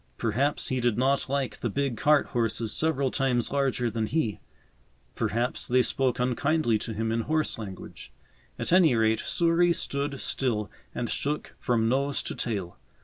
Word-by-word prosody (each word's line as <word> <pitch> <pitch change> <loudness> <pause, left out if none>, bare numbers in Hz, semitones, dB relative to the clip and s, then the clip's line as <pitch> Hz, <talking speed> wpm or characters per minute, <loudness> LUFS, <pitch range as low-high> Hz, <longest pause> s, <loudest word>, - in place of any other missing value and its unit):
Perhaps 125 +6 0
he 130 - 0
did 120 -3 +1
not 135 +2 +1
like 140 -1 -2
the 120 - -2
big 140 +2 -1
cart 150 +4 +3
horses 115 -2 -1
several 140 -5 +1
times 125 -3 +1
larger 135 -3 +1
than 110 -1 -1
he; 120 -9 -1 0.7
perhaps 120 +3 -1
they 125 +1 +4
spoke 130 -1 +1
unkindly 125 -1 +1
to 115 - -5
him 110 +1 -1
in 115 - 0
horse 155 +2 0
language; 95 -4 -9 0.5
at - - -1
any 170 -8 +6
rate, 110 0 +2
Souris 170 0 +2
stood 140 -1 -3
still 110 -6 -1 0.2
and 120 - -2
shook 145 +6 -3
from 115 -2 +1
nose 140 +3 0
to - - -4
tail. 95 - -4
125 Hz, 160 wpm, -27 LUFS, 115-140 Hz, 0.7 s, any